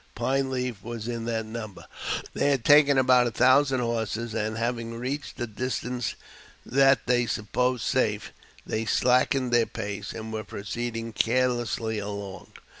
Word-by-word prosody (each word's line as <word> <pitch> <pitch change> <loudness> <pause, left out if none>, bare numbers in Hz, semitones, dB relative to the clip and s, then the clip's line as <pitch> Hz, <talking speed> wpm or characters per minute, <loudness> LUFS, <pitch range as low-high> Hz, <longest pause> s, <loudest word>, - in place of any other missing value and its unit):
Pine 135 0 0
Leaf 125 -5 -3
was 115 -1 -6
in 115 -1 -3
the 115 -1 -1
number. 110 -3 -7 0.5
They - - +1
had 135 -5 +1
taken 145 -1 +6
about 125 -1 +5
a - - -2
thousand 130 +2 +4
horses, 115 -1 -2
and, 110 0 -2
having 115 0 -2
reached 130 +5 -4
a 120 - -1
distance 125 +1 -3 0.5
that 135 +1 +4
they 120 -1 +2
supposed 125 +4 0
safe, - - 0 0.3
they 110 +1 -2
slackened 125 +2 +2
their 120 -1 +4
pace, 100 -1 -5
and 110 0 -7
were 110 0 -3
proceeding 115 +4 -5
carelessly 120 -2 0
along. 100 -2 -6
120 Hz, 145 wpm, -26 LUFS, 110-125 Hz, 0.5 s, taken